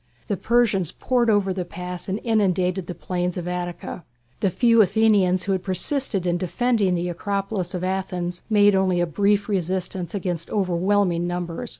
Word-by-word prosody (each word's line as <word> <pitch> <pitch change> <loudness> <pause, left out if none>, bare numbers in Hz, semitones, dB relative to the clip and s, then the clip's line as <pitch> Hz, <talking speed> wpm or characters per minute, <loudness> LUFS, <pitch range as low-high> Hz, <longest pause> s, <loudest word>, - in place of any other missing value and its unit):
The 205 - -1
Persians 210 -6 +1
poured 245 +1 +1
over 200 -3 +2
the 185 -1 -3
Pass 180 +1 -7
and 195 +3 -1
inundated 190 -5 +1
the 180 - -5
plains 180 -1 -3
of 175 -1 -4
Attica. 175 -1 -5 0.4
The 195 - +2
few 230 +4 +4
Athenians 195 -3 +3
who 200 - -2
had 190 -1 0
persisted 195 +1 -1
in 175 0 +1
defending 200 0 +1
the 175 +1 -1
Acropolis 195 0 -3
of 180 - -4
Athens 180 -2 -3
made 205 -1 +5
only 190 -2 +2
a 175 - +2
brief 200 +4 +1
resistance 185 -1 -2
against 175 -4 -3
overwhelming 185 -2 +1
numbers. 175 -1 -4
185 Hz, 165 wpm, -23 LUFS, 180-205 Hz, 0.4 s, made